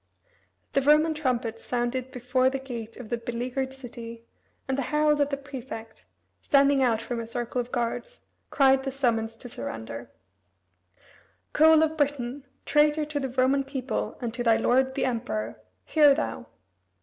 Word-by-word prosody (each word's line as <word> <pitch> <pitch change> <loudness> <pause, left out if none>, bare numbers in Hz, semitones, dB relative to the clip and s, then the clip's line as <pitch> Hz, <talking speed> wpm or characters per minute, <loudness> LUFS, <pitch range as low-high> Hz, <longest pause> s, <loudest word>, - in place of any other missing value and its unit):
The 275 - +3
Roman 300 +3 +4
trumpets 245 -6 -2
sounded 245 +1 -2
before 255 0 +1
the 270 - -2
gate 235 -4 -7
of 245 -4 -9
the 240 - -1
beleaguered 245 +3 -3
city, 235 -3 -9 0.4
and 265 - 0
the 275 - -1
herald 300 0 +3
of 285 - +2
the 280 - -2
prefect, 255 -5 -9 0.3
standing 280 -1 +4
out 235 -4 +3
from 240 0 -3
his 230 -1 -6
circle 240 +1 -2
of 245 +1 -9
guards, 245 - -3 0.3
cried 270 -1 +4
the 270 0 -3
summons 230 -4 0
to 245 - -9
surrender: 115 - -6 1.4
"Coel 315 0 +6
of 315 0 -1
Britain, 280 -2 -1 0.2
traitor 300 +1 +3
to 295 -1 -3
the 265 -1 -2
Roman 260 +2 +2
people 270 -1 -3
and 235 -2 -3
to 240 +1 -3
thy 230 -1 +5
lord 260 +3 +2
the - - +1
Emperor, 230 -3 -3 0.2
hear 295 -3 +5
thou! 115 - -3
260 Hz, 160 wpm, -27 LUFS, 235-280 Hz, 1.4 s, Coel